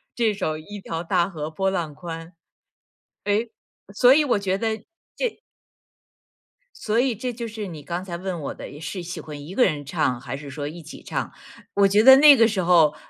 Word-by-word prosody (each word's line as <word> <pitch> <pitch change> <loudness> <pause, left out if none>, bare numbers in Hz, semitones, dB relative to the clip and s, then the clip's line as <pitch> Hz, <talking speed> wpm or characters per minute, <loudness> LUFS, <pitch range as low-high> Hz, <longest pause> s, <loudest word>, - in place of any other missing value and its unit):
这 230 -3 +2
首 155 -6 -2
一 205 +6 -9
条 165 -2 -4
大 175 0 +1
河 155 -4 -5
波 190 +4 0
浪 170 -5 -3
宽。 165 +1 -8 0.9
哎， 210 +3 +1 0.5
所 250 +5 +6
以 305 - +4
我 250 -7 +2
觉 195 -1 -1
得， 220 +1 -1 0.4
这 480 -3 -3 1.4
所 215 +1 -1
以 260 -1 +1
这 245 +3 -4
就 235 0 -5
是 215 -2 -6
你 155 -4 -9
刚 175 +4 -4
才 175 -3 -5
问 180 0 -4
我 145 - -5
的， 145 - -10
是 175 +3 -5
喜 175 +1 -6
欢 145 -2 -9
一 175 - -8
个 250 - +4
人 150 -5 -1
唱， 135 -5 -1
还 135 0 -5
是 145 0 -9
说 145 +1 -5
一 165 +4 -7
起 160 - -11
唱。 - - -4 0.4
我 200 0 +4
觉 205 +2 +4
得 265 +3 +10
那 285 0 +8
个 230 -1 +6
时 210 -4 -1
候， 165 -4 +5
185 Hz, 215 characters per minute, -23 LUFS, 155-220 Hz, 1.4 s, 得